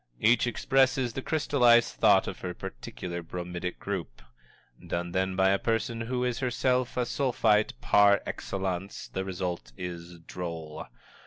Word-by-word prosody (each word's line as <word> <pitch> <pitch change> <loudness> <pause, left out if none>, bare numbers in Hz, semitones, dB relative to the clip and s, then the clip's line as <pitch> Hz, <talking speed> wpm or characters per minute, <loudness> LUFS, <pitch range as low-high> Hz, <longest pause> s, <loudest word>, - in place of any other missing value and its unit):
Each 120 - +4
expresses 130 0 +2
the 135 - -4
crystallized 125 -6 +3
thought - - +5
of - - -6
her - - -5
particular 85 +8 -6
bromidic 90 +1 -5
group. - - -5 0.6
Done, 85 0 -2
then, 95 +1 0
by 95 0 +4
a 100 0 +2
person 115 0 -1
who 125 +2 -2
is 125 -2 -1
herself 125 0 0
a 125 - +2
Sulphite 115 -5 +1
par 100 -1 +5
excellence, 95 0 -4
the 95 - -3
result 90 -9 -4
is 85 -1 -7
droll. 80 -3 -6
100 Hz, 140 wpm, -28 LUFS, 90-120 Hz, 0.6 s, thought